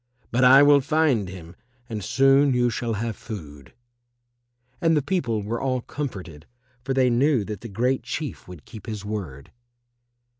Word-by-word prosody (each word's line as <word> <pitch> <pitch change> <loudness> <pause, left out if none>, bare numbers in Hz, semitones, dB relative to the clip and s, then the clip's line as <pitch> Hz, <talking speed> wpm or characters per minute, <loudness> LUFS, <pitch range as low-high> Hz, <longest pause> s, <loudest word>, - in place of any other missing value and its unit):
But 120 +2 +2
I 135 +3 +8
will 145 -1 +6
find 135 - +1
him 90 -2 -11 0.3
and 110 -4 -5
soon 135 +3 +3
you 120 -1 +2
shall 115 0 -3
have 110 +1 -3
food." 75 - -10 1.1
And 165 -2 +3
the 145 - 0
people 125 - -1
were 115 +3 -3
all 130 -2 -1
comforted, 95 - -7 0.4
for 135 +1 -2
they 130 -2 +3
knew 125 -2 +2
that 105 -2 -6
the 115 - -8
Great 125 +6 0
Chief 125 - -6
would 90 -4 -12
keep 110 0 -12
his 105 -3 -6
word. 90 -11 -6
120 Hz, 160 wpm, -24 LUFS, 100-135 Hz, 1.1 s, I